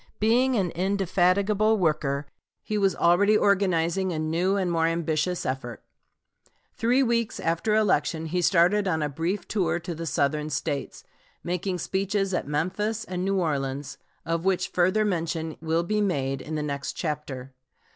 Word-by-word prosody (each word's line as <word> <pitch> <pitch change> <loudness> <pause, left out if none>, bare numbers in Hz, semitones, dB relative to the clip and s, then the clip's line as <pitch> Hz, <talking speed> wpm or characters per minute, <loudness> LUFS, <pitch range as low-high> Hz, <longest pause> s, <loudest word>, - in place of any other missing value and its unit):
Being 245 +4 +3
an 185 -6 0
indefatigable 195 +3 +2
worker, 150 -5 0 0.4
he 215 - -3
was 195 -2 +2
already 200 +5 +4
organizing 190 -2 +2
a 165 - -3
new 165 +5 0
and 185 -3 0
more 165 -1 +2
ambitious 165 +1 -1
effort. 130 -3 -4 0.9
Three 245 +4 +2
weeks 235 -2 0
after 170 +6 0
election 165 -7 +1
he 180 +3 -1
started 185 +4 +3
on 160 -4 0
a 150 - -1
brief 165 +8 -3
tour 175 -5 0
to 170 +1 -5
the 165 +1 -6
Southern 150 +1 0
States, 145 -3 -3 0.4
making 180 +1 -2
speeches 195 +2 -1
at - - -1
Memphis 195 +9 -1
and 180 -2 -4
New 195 +1 0
Orleans, 140 -4 -2 0.3
of 165 0 -1
which 190 -1 +1
further 185 +5 +2
mention 165 -4 -2
will 165 +1 0
be 210 +4 0
made 135 -9 -1
in 155 - -5
the 150 - -2
next 140 -1 -3
chapter. 140 -5 -5
175 Hz, 155 wpm, -26 LUFS, 155-200 Hz, 0.9 s, already